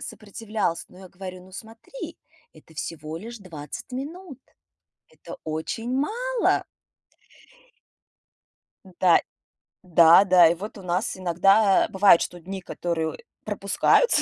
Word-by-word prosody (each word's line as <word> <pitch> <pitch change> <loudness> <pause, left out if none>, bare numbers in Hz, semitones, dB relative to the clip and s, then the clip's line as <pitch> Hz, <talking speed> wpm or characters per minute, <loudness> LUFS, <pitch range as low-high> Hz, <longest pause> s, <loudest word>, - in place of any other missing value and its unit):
сопротивлялся, 210 -5 -4
но 180 - -17
я 190 - -12
говорю: 185 0 -9
"Ну 190 - -18
смотри, 225 - -10 0.3
это 160 - -19
всего 155 0 -6
лишь 230 +7 -8
20 170 - -9
минут, 285 +1 -7 0.7
это - - -11
очень 160 +10 -4
мало". 475 - 0 2.2
Да. 180 -1 +3 0.6
Да, 170 0 +7
да. 180 -3 +7
И 165 - +2
вот 205 +6 -8
у 200 - -10
нас 180 +4 -2
иногда, 195 +3 +3
э, - - -9
бывает, 190 -3 +6
что 175 - -4
дни, 190 +3 -7
которые 170 -2 -3 0.3
пропускаются. - - +2
190 Hz, 120 wpm, -24 LUFS, 170-225 Hz, 2.2 s, Да